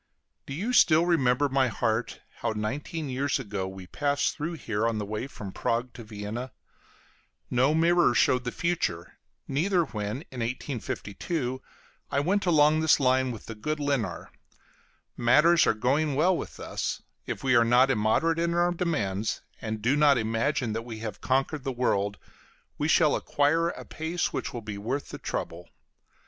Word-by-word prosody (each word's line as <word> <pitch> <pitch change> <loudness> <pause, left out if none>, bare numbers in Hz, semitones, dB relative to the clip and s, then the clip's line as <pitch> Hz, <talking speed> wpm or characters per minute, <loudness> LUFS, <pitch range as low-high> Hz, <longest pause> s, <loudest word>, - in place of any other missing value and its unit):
Do 135 - -5
you 215 +10 -2
still 165 -7 +5
remember, 145 -5 +3
my 135 -1 +2
heart, 115 0 -1 0.2
how - - -2
nineteen 140 +8 -3
years 135 +2 0
ago 100 -7 -4
we 95 -1 -9
passed 145 +7 0
through 160 +3 -3
here 115 -8 -1
on 115 -1 -1
the 105 - -3
way 105 +5 -4
from 105 -7 -8
Prague 120 +5 -2
to 120 - -9
Vienna? 110 +4 -6 1.0
No 130 +5 +3
mirror 170 -4 +4
showed 125 +3 +3
the 125 - -3
future, 155 - -2 0.3
neither 175 +6 +2
when, 110 0 -4
in 130 - -7
1852, 125 - -3 0.5
I 140 - +1
went 190 +6 +1
along 155 -2 +5
this 160 -1 +4
line 130 -1 +3
with 115 -4 -7
the 115 - -6
good 150 +9 -3
Lynar. 140 - -2 0.8
Matters 150 +8 +5
are - - +3
going 140 +6 +1
well 175 +6 +3
with - - -6
us; - - -3 0.2
if - - -4
we 130 -1 +3
are 120 - +6
not 125 +3 +4
immoderate 135 +9 +2
in 170 0 0
our 175 +1 +3
demands, 110 - -1 0.2
and 110 -1 -4
do 125 +5 +3
not 145 -2 +5
imagine 115 +2 0
that 115 - -2
we 115 -1 -8
have 110 -3 -6
conquered 135 +2 0
the 135 - -2
world, 105 -5 0 0.6
we 150 - -1
shall 160 -2 +4
acquire 160 +4 +1
a - - -7
pace 160 +2 -2
which - - -3
will 120 - -5
be 105 -1 -6
worth 130 +7 -3
the - - -7
trouble. 85 +1 -5
130 Hz, 170 wpm, -27 LUFS, 110-155 Hz, 1.0 s, are